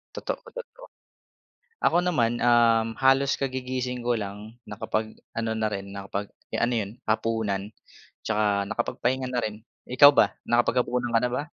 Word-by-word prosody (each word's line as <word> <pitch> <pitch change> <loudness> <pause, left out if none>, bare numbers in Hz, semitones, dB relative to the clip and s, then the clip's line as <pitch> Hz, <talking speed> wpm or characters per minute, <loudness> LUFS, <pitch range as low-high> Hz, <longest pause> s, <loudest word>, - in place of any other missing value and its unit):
Totoo, - - -4
totoo. - - -10 1.0
Ako 175 - +4
naman, 120 -10 +1
um, 115 -2 +3
halos 135 +1 +3
kagigising 130 -1 -3
ko 120 0 0
lang, 105 +2 -7
nakapag 110 +1 -3 0.2
ano 115 0 -1
na 110 -1 0
rin 100 -1 -6
nakapag 100 +1 -5 0.2
eh - - -4
ano 120 +1 +2
yun, 105 -4 -1
hapunan 110 -3 -1 0.6
'tsaka 105 -2 +1
nakapagpahinga 125 +2 -1
na 125 -2 -1
rin. 105 -1 -4 0.3
Ikaw 145 +3 +7
ba - - +4 0.2
nakapaghapunan 120 0 +1
ka 115 - +4
na 125 0 0
ba? 125 - -1
115 Hz, 145 wpm, -26 LUFS, 110-125 Hz, 1.0 s, Ikaw